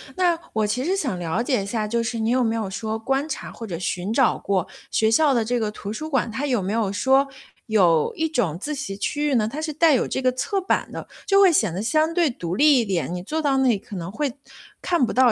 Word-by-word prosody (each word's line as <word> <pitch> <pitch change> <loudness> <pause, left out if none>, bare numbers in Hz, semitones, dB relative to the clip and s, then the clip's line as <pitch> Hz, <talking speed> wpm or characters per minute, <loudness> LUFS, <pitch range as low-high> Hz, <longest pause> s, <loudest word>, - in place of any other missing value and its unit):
那 350 -2 +2 0.2
我 215 -1 +1
其 240 +5 -1
实 370 +6 0
想 255 - -2
了 175 +6 -1
解 250 -4 +1
一 - - -6
下， 215 0 -2
就 235 +2 0
是 230 0 -3
你 220 +1 0
有 255 0 +2
没 225 -1 0
有 220 -3 -2
说 220 +3 -3
观 270 +6 -1
察 - - -5
或 225 - -8
者 170 - -4
寻 180 +2 -3
找 245 +1 +3
过 190 -3 -1 0.2
学 220 0 +2
校 290 +4 +4
的 230 -2 +1
这 245 +1 0
个 215 - -1
图 210 0 -6
书 310 +8 -5
馆， 260 -5 0
它 275 +6 -2
有 245 -6 +1
没 195 +3 -2
有 220 -4 0
说， 265 +7 +3 0.4
有 175 -8 +3
一 320 - 0
种 225 - -1
自 300 +7 -4
习 265 -9 -5
区 290 +9 -1
域 270 - +1
呢？ 215 -3 +2
它 285 +7 -5
是 315 0 -2
带 310 +1 +4
有 255 - +1
这 - - -2
个 255 -1 +2
侧 320 +10 -1
版 375 - -1
的， - - -7 0.2
就 395 -1 +5
会 385 -3 +7
显 215 - +2
得 180 - -4
相 310 +7 +2
对 335 -6 +3
独 175 -6 -4
立 290 +1 +5
一 - - +2
点， 180 -3 -2
你 180 - -4
坐 300 - -3
到 285 -3 +1
那 265 -1 +3
里 225 - +3
可 195 +1 -11
能 175 0 -5
会 280 +3 -2 0.5
看 345 -7 +2
不 - - -4
到 250 -2 +5
235 Hz, 290 characters per minute, -23 LUFS, 210-290 Hz, 0.5 s, 会